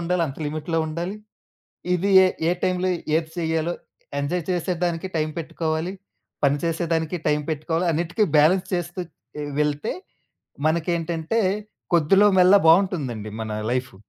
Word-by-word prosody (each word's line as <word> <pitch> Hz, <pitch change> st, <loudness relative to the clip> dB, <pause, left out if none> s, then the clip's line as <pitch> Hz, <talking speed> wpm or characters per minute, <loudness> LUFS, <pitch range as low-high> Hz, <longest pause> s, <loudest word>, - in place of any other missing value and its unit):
ఉండాలో 175 Hz, +1 st, 0 dB
అంత 135 Hz, -, -8 dB
లిమిట్‌లో 155 Hz, +2 st, -2 dB
ఉండాలి. 170 Hz, +6 st, -4 dB, 0.8 s
ఇది 180 Hz, +3 st, +1 dB, 0.2 s
ఏ -, -, +4 dB, 0.2 s
ఏ -, -, +3 dB
టైంలో 185 Hz, 0 st, +1 dB, 0.3 s
ఏది 160 Hz, 0 st, 0 dB
సేయ్యాలో, 160 Hz, 0 st, 0 dB, 0.5 s
ఎంజాయ్ 165 Hz, +5 st, -1 dB
చేసేదానికి 175 Hz, 0 st, -1 dB
టైం 155 Hz, 0 st, 0 dB
పెట్టుకోవాలి, 160 Hz, +2 st, -2 dB, 0.5 s
పని 140 Hz, 0 st, +4 dB
చేసేదానికి 165 Hz, 0 st, -1 dB
టైం 150 Hz, 0 st, +2 dB
పెట్టుకోవాలి. 160 Hz, +3 st, -1 dB
అన్నిటికి 170 Hz, +7 st, 0 dB
బ్యాలెన్స్ 180 Hz, +6 st, +4 dB
చేస్తూ 175 Hz, 0 st, -3 dB, 0.6 s
వెళ్తే 150 Hz, +6 st, 0 dB, 0.8 s
మనకేంటంటే 165 Hz, +4 st, 0 dB, 0.5 s
కొద్దిలో 175 Hz, +5 st, +5 dB
మెల్లా 185 Hz, +2 st, +7 dB
బావుంటుందండి 160 Hz, -, +2 dB
మన 110 Hz, -, -4 dB, 0.2 s
లైఫు. 125 Hz, -3 st, -2 dB
165 Hz, 120 wpm, -23 LUFS, 155-180 Hz, 0.8 s, మెల్లా